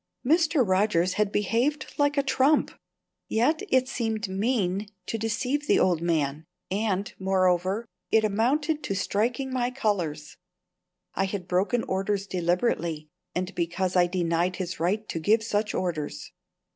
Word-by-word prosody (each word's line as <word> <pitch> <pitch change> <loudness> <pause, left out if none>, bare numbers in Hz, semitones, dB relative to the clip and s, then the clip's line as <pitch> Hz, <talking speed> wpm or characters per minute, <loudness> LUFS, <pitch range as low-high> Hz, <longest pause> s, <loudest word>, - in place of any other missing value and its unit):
Mr. 305 - +3
Rogers 185 -2 +2
had 210 -1 +1
behaved 235 +9 0
like 290 0 +2
a 280 - +3
trump; 275 +2 +3 0.6
yet 250 - +2
it 260 0 +3
seemed 225 -4 -2
mean 200 -1 0 0.2
to 225 - -3
deceive 255 +7 -1
the - - +4
old 175 -3 +2
man; 155 -3 0 0.3
and, 200 0 -1
moreover, 190 +2 +1 0.2
it 220 0 +4
amounted 280 +9 +1
to 195 - -3
striking 235 +7 -1
my 245 -1 +1
colours. 180 - -2 0.8
I 195 - +1
had 190 -2 -4
broken 195 +7 +1
orders 195 +1 -1
deliberately 175 -4 -1 0.3
and 185 +2 -2
because 175 +2 -1
I 175 -1 +5
denied 175 0 0
his 180 -3 -4
right 205 +6 0
to 165 - -3
give 215 +7 +3
such 210 -1 -1
orders. 160 -5 -3
200 Hz, 140 wpm, -26 LUFS, 180-235 Hz, 0.8 s, I